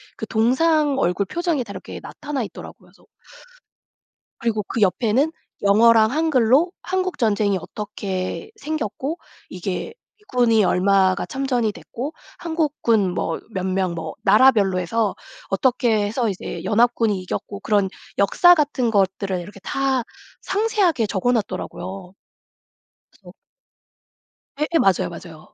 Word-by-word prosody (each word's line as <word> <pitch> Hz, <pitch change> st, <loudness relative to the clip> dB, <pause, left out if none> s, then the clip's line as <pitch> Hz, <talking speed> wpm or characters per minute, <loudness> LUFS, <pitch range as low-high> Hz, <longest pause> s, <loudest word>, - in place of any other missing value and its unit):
그 220 Hz, -, -6 dB
동상 280 Hz, +6 st, +2 dB
얼굴 180 Hz, +3 st, +1 dB
표정이 335 Hz, -, -1 dB
다 205 Hz, -, -10 dB
이렇게 190 Hz, -, -8 dB
나타나 290 Hz, -4 st, -5 dB
있더라고요. -, -, -9 dB, 0.2 s
그래서 -, -, -25 dB, 1.3 s
그리고 220 Hz, -2 st, -1 dB
그 220 Hz, +2 st, -4 dB
옆에는 235 Hz, -, +2 dB, 0.3 s
영어랑 220 Hz, +2 st, +5 dB
한글로 300 Hz, +1 st, +3 dB
한국전쟁이 220 Hz, -, 0 dB
어떻게 200 Hz, -, -5 dB
생겼고 305 Hz, -, -3 dB, 0.3 s
이게 185 Hz, -, -4 dB, 0.3 s
미군이 245 Hz, -, +2 dB
얼마가 190 Hz, 0 st, +3 dB
참전이 255 Hz, -5 st, -1 dB
됐고 265 Hz, +8 st, -7 dB, 0.2 s
한국군 295 Hz, -, 0 dB
뭐 165 Hz, -2 st, -2 dB
몇 185 Hz, -1 st, -2 dB
명 185 Hz, -2 st, 0 dB
뭐 160 Hz, -1 st, -5 dB
나라별로 205 Hz, -3 st, +5 dB
해서 210 Hz, +4 st, -1 dB, 0.3 s
어떻게 225 Hz, -1 st, +2 dB
해서 225 Hz, +2 st, -1 dB
이제 175 Hz, -3 st, -6 dB
연합군이 225 Hz, 0 st, +2 dB
이겼고 200 Hz, +2 st, -5 dB
그런 200 Hz, -3 st, +1 dB, 0.3 s
역사 350 Hz, -, +6 dB
같은 285 Hz, -7 st, 0 dB
것들을 195 Hz, -2 st, 0 dB
이렇게 195 Hz, +3 st, -10 dB
다 270 Hz, +1 st, 0 dB, 0.4 s
상세하게 390 Hz, -, +1 dB
적어놨더라고요. 195 Hz, -3 st, -3 dB, 1.0 s
그래서 -, -, -16 dB, 1.3 s
예예 310 Hz, +3 st, +1 dB
맞아요, 185 Hz, -, +2 dB
맞아요. 170 Hz, -2 st, -12 dB
220 Hz, 285 characters per minute, -22 LUFS, 195-270 Hz, 1.3 s, 역사